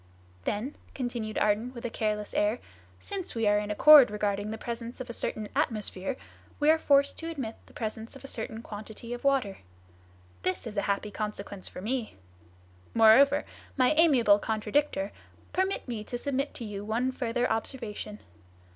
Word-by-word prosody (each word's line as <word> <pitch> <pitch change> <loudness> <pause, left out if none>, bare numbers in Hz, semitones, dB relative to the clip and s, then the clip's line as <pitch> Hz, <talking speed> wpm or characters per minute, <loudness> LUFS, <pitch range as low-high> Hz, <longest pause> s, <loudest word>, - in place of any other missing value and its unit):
"Then," 235 +8 -2 0.2
continued 240 -4 -3
Ardan, 215 +5 +1
with 235 - -7
a 240 - -2
careless 210 -2 -2
air, 210 +3 +2 0.4
"since 390 -8 -5
we 225 -1 0
are 205 0 +4
in 210 0 -4
accord 275 +5 +9
regarding 205 0 -1
the 220 - -4
presence 235 +2 -6
of 255 -1 -5
a - - -7
certain 215 -2 -3
atmosphere, 215 +2 0 0.4
we 300 +1 +5
are 320 - +3
forced 280 -2 +3
to 330 - -4
admit 265 -9 -4
the - - -18
presence 220 +2 -5
of 270 - -12
a - - -7
certain 225 -2 -5
quantity 220 +3 -7
of 245 - -7
water. 265 -8 +1 0.8
This 185 - -1
is 220 -2 -6
a 200 - +1
happy 200 +1 -1
consequence 210 -2 -5
for - - -8
me. 235 +2 -2 0.8
Moreover, 270 +6 +6 0.3
my 255 -1 +4
amiable 260 -11 +5
contradictor, 215 0 0 0.4
permit 380 -3 0
me 230 -4 -4
to 245 - -4
submit 275 +2 -2
to 235 - -6
you 205 -1 -5
one 235 +5 0
further 245 -1 -1
observation. 220 -3 -4
230 Hz, 165 wpm, -29 LUFS, 210-265 Hz, 0.8 s, accord